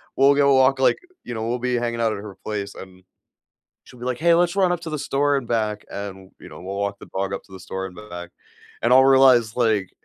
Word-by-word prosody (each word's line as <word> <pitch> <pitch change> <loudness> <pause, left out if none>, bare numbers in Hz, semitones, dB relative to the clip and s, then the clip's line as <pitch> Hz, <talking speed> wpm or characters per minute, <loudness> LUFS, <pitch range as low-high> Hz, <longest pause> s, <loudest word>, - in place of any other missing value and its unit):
we'll 140 +1 +5
go 140 -1 +4
walk, 130 0 +4
like, 135 - +3 0.3
you 120 - -6
know, 110 0 -4
we'll 120 +1 -2
be 125 0 -1
hanging 120 -1 -2
out 110 -1 +1
at 100 - -6
her 100 -2 -9
place, 105 -2 -4
and 95 -1 -12 0.8
she'll 125 - -16
be 125 - -6
like, 125 -1 -2
"Hey, 170 +1 +4
let's 175 +1 +2
run 185 -2 +3
up 175 - -2
to 160 - -6
the 155 - -3
store 145 +1 +1
and 130 -4 -3
back." 110 -3 -1
and, 95 -2 -7
you - - -11
know, - - -12
we'll 95 +1 -5
walk 100 0 -2
the - - -12
dog 95 0 -2
up - - -6
to 95 - -21
the 95 - -10
store 95 +1 -5
and 90 - -11
back, 90 -5 -9 0.5
and 120 +2 +2
I'll 130 +1 +7
realize, 130 -4 +5
like 110 -6 +1
115 Hz, 255 wpm, -22 LUFS, 100-135 Hz, 0.8 s, I'll